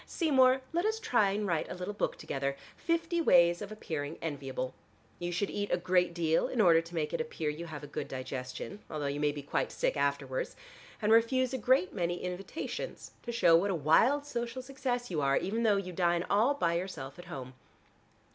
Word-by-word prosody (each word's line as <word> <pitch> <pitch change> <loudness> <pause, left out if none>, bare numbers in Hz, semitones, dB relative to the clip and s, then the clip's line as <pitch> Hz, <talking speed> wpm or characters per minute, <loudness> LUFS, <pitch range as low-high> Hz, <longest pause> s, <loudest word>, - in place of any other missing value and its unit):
Seymour, 265 -5 +4
let 345 +1 +1
us 440 +1 0
try 235 - +3
and 205 +2 -1
write 170 -5 -1
a - - -5
little 180 +3 -4
book 205 - -2
together, 140 0 -3 0.2
'Fifty 335 0 0
ways 175 - +5
of 205 0 -6
appearing 155 -7 -4
enviable.' 135 -4 -4 0.5
You 175 0 -3
should 185 +4 -1
eat 205 0 -3
a - - +3
great 180 -1 +2
deal 165 -2 +2
in 245 - -4
order 170 -5 +6
to 165 +1 -11
make 155 -1 -1
it 170 - 0
appear 155 -1 -2
you 170 +3 -7
have 150 -3 -7
a 145 - -10
good - - -3
digestion, 130 +7 -6
although 150 -2 -3
you 140 +1 -2
may 150 0 +2
be 145 -1 -7
quite 140 - -1
sick - - 0
afterwards, 140 -2 -1 0.5
and 210 - +3
refuse 255 +3 +4
a - - 0
great 245 -5 +3
many 175 -2 -1
invitations 185 - -5
to 240 - -5
show 180 -8 +5
what 185 +5 +3
a 190 - +1
wild 225 - +4
social 240 -1 -4
success 255 -3 -3
you 155 -4 0
are, 135 0 +3
even 220 +5 -1
though 215 -3 +4
you 185 -2 -4
dine 175 0 +1
all 225 +8 +4
by 170 -11 +1
yourself 170 -6 -4
at 175 - -10
home. 135 -7 -7
180 Hz, 205 wpm, -31 LUFS, 150-230 Hz, 0.5 s, order